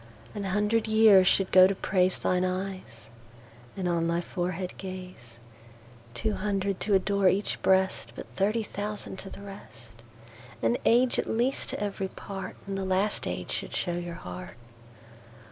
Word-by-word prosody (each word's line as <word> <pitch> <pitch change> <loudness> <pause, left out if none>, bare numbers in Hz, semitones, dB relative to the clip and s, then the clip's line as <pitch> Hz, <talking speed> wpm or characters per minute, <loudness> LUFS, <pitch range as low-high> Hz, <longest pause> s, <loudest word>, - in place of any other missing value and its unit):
An 205 -1 -4
hundred 210 +4 +1
years 215 -4 +6
should 195 -1 +3
go 185 0 +8
to 195 - -1
praiseThine 185 -1 +1
Eyes, 185 - -4 0.7
and 185 -2 -1
on 170 -1 +1
thy 170 0 +1
Forehead 180 +1 -3
Gaze.Two 120 - -8
hundred 200 -1 -1
to 205 -1 +2
adore 195 0 +3
each 200 +3 -1
Breast:But 190 0 +1
thirty 210 +4 +1
thousand 205 -2 -5
to 195 - -8
the 200 - -10
rest. 120 - -12 0.6
An 115 +1 +2
Age 245 +2 +4
at - - -2
least 245 +4 0
to - - -4
every 200 -2 -2
part, 195 0 -7
And 195 -1 -3
the - - -2
last 190 +2 0
Age - - -4
should - - -4
show 175 - -1
your 175 -1 -4
Heart. 90 - -8
190 Hz, 145 wpm, -28 LUFS, 170-200 Hz, 0.7 s, go